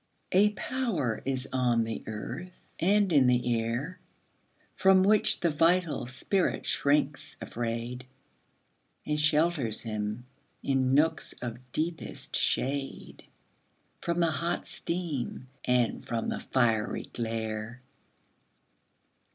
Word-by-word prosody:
A 200 Hz, +3 st, +5 dB
power 205 Hz, -, -1 dB
is 135 Hz, 0 st, -1 dB
on 120 Hz, -3 st, +2 dB
the 115 Hz, 0 st, -4 dB
earth 130 Hz, +12 st, -6 dB, 0.2 s
and 200 Hz, +1 st, +3 dB
in 135 Hz, -4 st, +6 dB
the 125 Hz, -1 st, +3 dB
air 125 Hz, +10 st, -3 dB, 0.8 s
From 190 Hz, -1 st, +5 dB
which 210 Hz, +1 st, +4 dB
the 170 Hz, -, +2 dB
vital 165 Hz, -2 st, +2 dB
spirit 180 Hz, +10 st, 0 dB
shrinks 140 Hz, 0 st, +1 dB
afraid, 120 Hz, +2 st, -4 dB, 1.0 s
And 150 Hz, 0 st, 0 dB
shelters 150 Hz, -6 st, +2 dB
him, 110 Hz, +1 st, -3 dB, 0.4 s
in 135 Hz, -1 st, +2 dB
nooks 160 Hz, +1 st, +2 dB
of 120 Hz, -1 st, -6 dB
deepest 165 Hz, +4 st, -3 dB
shade, 135 Hz, +1 st, -1 dB, 0.8 s
From 170 Hz, 0 st, 0 dB
the 165 Hz, -1 st, +3 dB
hot 170 Hz, +2 st, -1 dB
steam 155 Hz, -7 st, -3 dB, 0.2 s
and 125 Hz, -2 st, +2 dB
from 115 Hz, -1 st, -2 dB
the -, -, -2 dB
fiery 115 Hz, -4 st, +1 dB
glare. 115 Hz, +1 st, -4 dB
135 Hz, 105 wpm, -29 LUFS, 120-170 Hz, 1.0 s, in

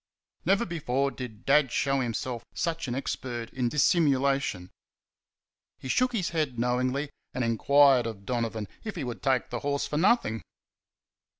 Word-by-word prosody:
Never 195 Hz, +6 st, +3 dB
before 140 Hz, -5 st, -1 dB
did 120 Hz, -6 st, -8 dB
Dad 140 Hz, -2 st, +4 dB
show 135 Hz, +2 st, +1 dB
himself 120 Hz, 0 st, -3 dB
such 165 Hz, -3 st, -2 dB
an 120 Hz, -, -2 dB
expert 120 Hz, -3 st, -4 dB
in 125 Hz, -2 st, 0 dB
dissimulation. 135 Hz, -, +2 dB, 1.1 s
He 130 Hz, -, -8 dB
shook 255 Hz, -, +2 dB
his 190 Hz, -7 st, 0 dB
head 155 Hz, -7 st, -1 dB
knowingly, 125 Hz, +4 st, 0 dB, 0.2 s
and 130 Hz, -, 0 dB
enquired 130 Hz, +2 st, +4 dB
of 100 Hz, -3 st, -7 dB
Donovan 115 Hz, -3 st, -2 dB, 0.2 s
if 220 Hz, -, -5 dB
he 165 Hz, -, -3 dB
would 120 Hz, -6 st, -5 dB
take 130 Hz, 0 st, +1 dB
the 120 Hz, -, -2 dB
horse 140 Hz, +1 st, -1 dB
for 150 Hz, -, -3 dB
nothing. 165 Hz, -, +2 dB
130 Hz, 145 wpm, -28 LUFS, 120-150 Hz, 1.1 s, Dad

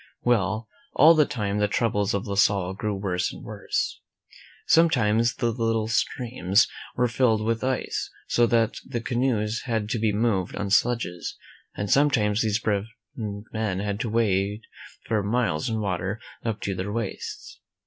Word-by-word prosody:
Well, 110 Hz, -2 st, +1 dB, 0.3 s
all 160 Hz, +2 st, +7 dB
the 155 Hz, -3 st, +4 dB
time 105 Hz, -6 st, -2 dB
the 105 Hz, -, +3 dB
troubles 105 Hz, -2 st, 0 dB
of 100 Hz, -, -2 dB
La 100 Hz, -, -3 dB
Salle 100 Hz, -2 st, +2 dB
grew 105 Hz, +1 st, -2 dB
worse 95 Hz, -2 st, -1 dB
and -, -, -11 dB
worse. -, -, -3 dB, 0.6 s
Sometimes 120 Hz, -8 st, +3 dB
the 120 Hz, -2 st, 0 dB
little 115 Hz, -1 st, 0 dB
streams 110 Hz, -4 st, +1 dB, 0.3 s
were 125 Hz, -, +2 dB
filled 115 Hz, -3 st, +2 dB
with 115 Hz, +1 st, 0 dB
ice, 130 Hz, 0 st, -1 dB, 0.2 s
so 120 Hz, 0 st, +3 dB
that 115 Hz, -1 st, +1 dB
the 120 Hz, -, -4 dB
canoes 115 Hz, -3 st, 0 dB
had 110 Hz, -3 st, -1 dB
to 115 Hz, -, -1 dB
be 110 Hz, -1 st, +2 dB
moved 105 Hz, -4 st, 0 dB
on 100 Hz, -1 st, -3 dB
sledges, 110 Hz, -6 st, 0 dB, 0.4 s
and 100 Hz, -, -3 dB
sometimes 110 Hz, -5 st, +3 dB
these 110 Hz, -2 st, +1 dB
brave 105 Hz, -2 st, 0 dB, 0.3 s
men 105 Hz, -2 st, -3 dB
had 100 Hz, +1 st, -2 dB
to 115 Hz, -, -2 dB
wade 105 Hz, -1 st, +1 dB, 0.4 s
for 110 Hz, -2 st, +1 dB
miles 100 Hz, -6 st, 0 dB
in 110 Hz, -1 st, -1 dB
water 95 Hz, +1 st, -2 dB, 0.2 s
up 115 Hz, -2 st, -2 dB
to 100 Hz, -, -2 dB
their 95 Hz, +2 st, -4 dB
waists. 115 Hz, -2 st, -5 dB
110 Hz, 160 wpm, -25 LUFS, 100-115 Hz, 0.6 s, all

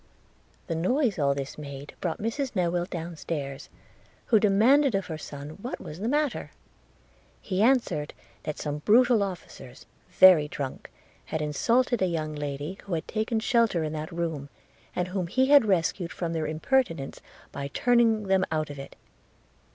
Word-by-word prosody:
The 170 Hz, -, -3 dB
noise 205 Hz, -, +1 dB
all 140 Hz, -1 st, +2 dB
this 140 Hz, +1 st, -5 dB
made 140 Hz, -1 st, -8 dB
brought 170 Hz, -3 st, -2 dB
Mrs 240 Hz, +5 st, -2 dB
Newill 175 Hz, -2 st, 0 dB
down 170 Hz, 0 st, -5 dB
stairs, 140 Hz, -4 st, -5 dB, 0.6 s
who 220 Hz, -, +4 dB
demanded 230 Hz, +6 st, +4 dB
of 195 Hz, -, 0 dB
her 160 Hz, -, -5 dB
son 145 Hz, 0 st, -8 dB
what 250 Hz, -, -5 dB
was 150 Hz, -, -9 dB
the 215 Hz, -, -2 dB
matter? 290 Hz, +1 st, 0 dB, 0.9 s
He 190 Hz, -1 st, -2 dB
answered, 230 Hz, -, +2 dB, 0.3 s
that 150 Hz, -1 st, -5 dB
some 150 Hz, 0 st, -3 dB
brutal 235 Hz, +6 st, +4 dB
officers, 175 Hz, -9 st, -7 dB, 0.2 s
very 180 Hz, -6 st, +7 dB
drunk, 140 Hz, -3 st, -6 dB, 0.4 s
had 160 Hz, -, -3 dB
insulted 230 Hz, -, +1 dB
a 185 Hz, -, +3 dB
young 155 Hz, -3 st, -2 dB
lady 145 Hz, +5 st, -5 dB
who 190 Hz, -4 st, -2 dB
had 160 Hz, -, -4 dB
taken 220 Hz, +1 st, -1 dB
shelter 230 Hz, -7 st, +2 dB
in 155 Hz, 0 st, -3 dB
that 155 Hz, +1 st, -5 dB
room, 165 Hz, -4 st, -3 dB, 0.5 s
and 180 Hz, 0 st, -1 dB
whom 185 Hz, -2 st, -2 dB
he 260 Hz, +9 st, +2 dB
had 285 Hz, -5 st, +7 dB
rescued 180 Hz, -2 st, 0 dB
from 170 Hz, -2 st, -3 dB
their 160 Hz, -2 st, -1 dB
impertinence 165 Hz, -, 0 dB, 0.3 s
by 140 Hz, 0 st, -4 dB
turning 230 Hz, -, +3 dB
them 190 Hz, -1 st, +2 dB
out 155 Hz, -2 st, -1 dB
of 140 Hz, -, -8 dB
it. 135 Hz, -, -9 dB
175 Hz, 160 wpm, -27 LUFS, 150-220 Hz, 0.9 s, very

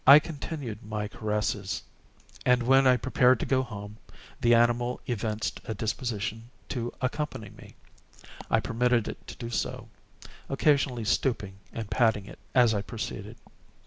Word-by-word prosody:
I 140 Hz, +2 st, +12 dB
continued 145 Hz, -, -4 dB
my 105 Hz, -1 st, -3 dB
caresses, 105 Hz, -2 st, -2 dB, 0.6 s
and, 125 Hz, -1 st, +4 dB
when 135 Hz, +2 st, +5 dB
I 125 Hz, -1 st, +6 dB
prepared 125 Hz, 0 st, +4 dB
to -, -, -1 dB
go 130 Hz, -1 st, +2 dB
home, 105 Hz, -4 st, -7 dB, 0.4 s
the 120 Hz, -2 st, +5 dB
animal 120 Hz, +1 st, +2 dB
evinced 110 Hz, -2 st, -2 dB
a 110 Hz, -, -3 dB
disposition 115 Hz, -1 st, -3 dB, 0.2 s
to 120 Hz, -2 st, -2 dB
accompany 130 Hz, -5 st, -3 dB
me. 105 Hz, -, -14 dB, 0.7 s
I -, -, +3 dB
permitted 120 Hz, -1 st, +1 dB
it -, -, -7 dB
to -, -, -7 dB
do 115 Hz, 0 st, -6 dB
so; -, -, -3 dB, 0.6 s
occasionally 135 Hz, -4 st, +2 dB
stooping 100 Hz, -5 st, 0 dB
and 115 Hz, -2 st, -5 dB
patting 110 Hz, -5 st, +3 dB
it -, -, -12 dB, 0.2 s
as 120 Hz, -3 st, +6 dB
I 100 Hz, -, 0 dB
proceeded. 115 Hz, +2 st, -6 dB
120 Hz, 145 wpm, -28 LUFS, 105-130 Hz, 0.7 s, I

